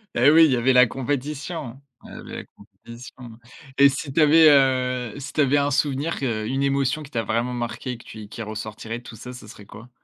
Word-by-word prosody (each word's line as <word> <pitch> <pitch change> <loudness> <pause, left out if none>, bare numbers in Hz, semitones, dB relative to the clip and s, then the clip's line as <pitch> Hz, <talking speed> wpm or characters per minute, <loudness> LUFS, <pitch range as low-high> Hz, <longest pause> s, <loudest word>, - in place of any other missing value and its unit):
Eh 125 +4 +5
oui, 160 0 +7
y 130 - +1
avait 125 +2 +2
la 125 0 +7
compétition. 140 +1 -5 0.2
Il - - -13
y - - -11
avait - - -9
la - - -7
compétition 120 0 -14 0.4
et 140 0 +7
si 140 0 -5
tu 160 - +2
avais, 155 +2 +6
heu, 130 -4 +2
si 140 0 -8
tu 155 - +1
avais 140 +1 +3
un 145 0 +1
souvenir 145 +4 -1
que 110 -5 -2
une 135 +3 -1
émotion 140 +2 0
qui 140 - -13
t'a 115 -4 -2
vraiment 115 +4 -2
marquée 120 +1 -4
et - - -8
que 115 - -16
tu 110 - -11
y - - -8
et - - -11
qui 115 - -8
ressortirait 110 +2 -7
de - - -21
tout 115 - -11
ça, 125 +3 -9
ce 125 -4 -12
serait 105 -1 -13
quoi? 115 +5 -13
130 Hz, 245 wpm, -23 LUFS, 115-140 Hz, 0.4 s, oui